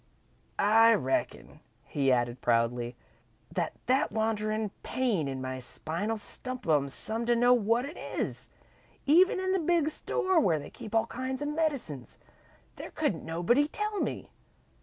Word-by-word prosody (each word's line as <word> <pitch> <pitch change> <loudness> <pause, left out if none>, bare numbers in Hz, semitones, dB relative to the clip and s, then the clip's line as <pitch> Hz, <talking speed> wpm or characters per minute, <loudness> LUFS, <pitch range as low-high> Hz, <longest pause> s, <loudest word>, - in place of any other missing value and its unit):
"I 225 +2 +6
reckon," 135 -9 -2 0.2
he 135 -2 0
added, 120 0 0
proudly, 120 +1 +1 0.6
"that 170 -3 -1
that 265 +4 +2
wanderin' 215 -1 -1
pain 220 - 0
in 135 -1 -4
my 130 0 -4
spine'll 170 - -3
stump 255 +2 -6
'em 145 -3 +3
some 220 - -2
to 240 - +4
know 245 +1 +5
what 235 +1 +2
it 295 +5 -8
is. - - -4 0.6
Even 355 +7 +5
in 375 0 0
the 380 - +2
big 330 -2 +2
store 375 +2 +1
where 175 - +3
they 145 - -8
keep 215 - -8
all 225 - +4
kinds 260 +2 -4
of 290 - -2
medicines, 285 - -2 0.6
there - - -7
couldn't - - -1
nobody 175 - +2
tell 420 +4 -3
me. - - -3
225 Hz, 150 wpm, -29 LUFS, -, 0.6 s, I